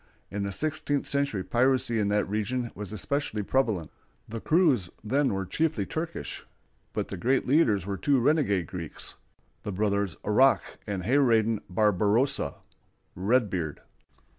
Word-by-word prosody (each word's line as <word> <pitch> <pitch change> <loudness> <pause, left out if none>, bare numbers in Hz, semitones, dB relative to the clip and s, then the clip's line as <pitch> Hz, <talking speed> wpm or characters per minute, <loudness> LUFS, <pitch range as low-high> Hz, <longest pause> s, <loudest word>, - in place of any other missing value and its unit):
In 100 - -3
the 100 0 -2
sixteenth 145 +3 -1
century 140 -9 -1
piracy 120 +2 +2
in 105 - +1
that 105 0 +1
region 110 +4 -2
was 105 -1 -7
especially 110 +1 -2
prevalent. 110 - 0 0.4
The 115 0 -6
crews 150 - +3
then 135 +6 +1
were 95 -1 -2
chiefly 155 - 0
Turkish, 165 - -5 0.5
but - - -3
the 95 - -5
great 130 +8 +1
leaders 115 - +3
were 100 -1 -3
two 140 +3 +2
renegade 120 - +2
Greeks, 85 -3 -6 0.5
the 105 - -4
brothers 100 -1 0
Aruck 130 +6 +3
and 100 -3 -3
Hayradin 115 -3 +3
Barbarossa 105 +7 +2 0.6
("Redbeard"). 95 - 0
110 Hz, 135 wpm, -28 LUFS, 100-135 Hz, 0.6 s, crews